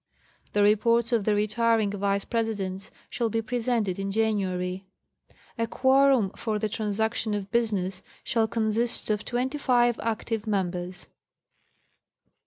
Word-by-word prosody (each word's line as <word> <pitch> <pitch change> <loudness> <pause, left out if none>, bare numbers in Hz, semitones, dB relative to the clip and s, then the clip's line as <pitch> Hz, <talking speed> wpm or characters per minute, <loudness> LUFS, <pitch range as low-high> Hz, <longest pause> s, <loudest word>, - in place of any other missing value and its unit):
The 205 - +3
reports 230 +3 +3
of 225 -4 +1
the 215 - +3
retiring 215 0 +2
Vice 200 0 -1
Presidents 200 -4 -2 0.2
shall 235 -2 -1
be 225 +1 -1
presented 230 -5 -1
in 195 0 -2
January. 190 -3 -1 0.7
A 230 - +1
quorum 260 -4 +3
for 215 -1 -3
the 215 +1 -1
transaction 215 +1 -1
of 200 -1 -5
business 195 -5 0 0.2
shall 225 -2 +1
consist 220 +1 0
of 210 0 -1
twenty 260 +4 -2
five 240 -3 +3
active 225 -1 -2
members. 180 -3 -2
220 Hz, 125 wpm, -26 LUFS, 200-230 Hz, 0.7 s, The